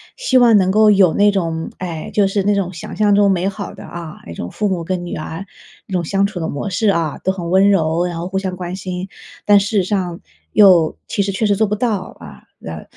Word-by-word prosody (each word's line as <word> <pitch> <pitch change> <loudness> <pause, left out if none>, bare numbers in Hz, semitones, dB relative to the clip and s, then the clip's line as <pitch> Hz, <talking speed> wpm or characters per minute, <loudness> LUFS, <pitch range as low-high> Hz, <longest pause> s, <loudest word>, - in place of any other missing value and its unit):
希 - - +1
望 240 -3 +6
能 185 -2 +2
够 215 +1 +5
有 190 -5 +4
那 205 0 +4
种 165 -4 -2
哎， 170 -4 -5
就 205 -2 +3
是 195 0 -1
那 205 - +2
种 190 -3 -1
想 165 - -8
象 210 -1 +3
中 200 -1 +4
美 185 0 0
好 200 -1 -7
的 - - -11
啊， 170 -2 -9
那 85 - -7
种 85 +1 -6
父 210 - -1
母 180 -3 -2
跟 175 +1 -3
女 175 - -5
儿 160 +4 -6 0.4
这 190 - -9
种 175 - 0
相 195 +4 +1
处 200 -3 -4
的 160 - -2
模 145 +8 -4
式 200 +3 +1
啊， 165 -6 0
都 190 - +1
很 175 -3 -5
温 190 +2 +4
柔， 170 -3 +1
然 175 -1 -4
后 170 - -4
互 190 +1 -3
相 190 -1 -4
关 180 0 -5
心。 185 0 -5 0.4
但 205 -1 +6
事 200 +1 -2
实 195 - +3
上 180 -3 -2 0.3
又 180 -6 +5
其 200 - -1
实 195 - -2
确 195 +3 -1
实 205 -1 +2
做 220 - +2
不 210 - -1
到， 215 -3 -2
啊， - - -12 0.2
呃， 80 -1 -7
190 Hz, 270 characters per minute, -18 LUFS, 175-200 Hz, 0.4 s, 望